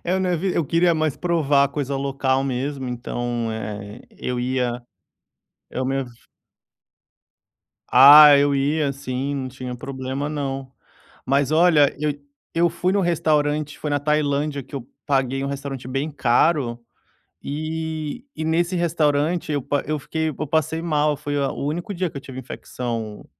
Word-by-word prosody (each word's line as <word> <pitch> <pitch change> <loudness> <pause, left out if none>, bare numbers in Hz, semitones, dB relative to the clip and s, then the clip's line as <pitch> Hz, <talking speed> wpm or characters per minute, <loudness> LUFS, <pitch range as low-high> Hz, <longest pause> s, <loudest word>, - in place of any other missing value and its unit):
Eu 185 +2 0
não 185 -1 0
evi 180 +2 -1
eu 165 - +1
queria 170 +4 +3
mais 155 -3 0
provar 145 -5 +2
coisa 140 -1 -3
local 135 -1 0
mesmo, 135 0 -3
então, 120 -1 -3
eh, 105 -1 -6
eu 125 -1 -4
ia 125 0 0 1.0
eu 130 - -3
me 135 0 0 1.9
Ah, 145 +1 +10
eu 140 0 +3
ia 140 +1 +1
sim, 135 +1 -3
não 130 -2 -3
tinha 125 -1 -7
problema 135 +2 -4
não. 135 -3 -4 0.5
Mas 140 +1 +2
olha, 155 -3 +4
eu 150 -1 0 0.4
eu 170 0 +3
fui 180 +2 -1
no 200 - +2
restaurante, 150 -4 +1
foi 150 - -4
na 145 - +2
Tailândia 145 -1 0
que 135 - -15
eu 125 -2 -8 0.2
paguei 135 -1 0
um 140 - -2
restaurante 135 -2 -5
bem 135 +4 -2
caro, 135 -2 +2 0.7
e 160 - -4
e 160 - -4
nesse 170 +3 +1
restaurante 160 -1 +1
eu 145 - 0
pa 145 +3 -1
eu 155 +1 -2
fiquei, 160 +3 -2
eu 155 +1 -5
passei 160 +2 0
mal, 150 -2 +1
foi 145 +1 -3
a 140 -1 0
o - - -5
único 175 +7 -3
dia 180 -1 -1
que - - -20
eu 140 - -7
tive 130 -1 -8
infecção 115 -4 -6
145 Hz, 155 wpm, -22 LUFS, 135-155 Hz, 1.9 s, Ah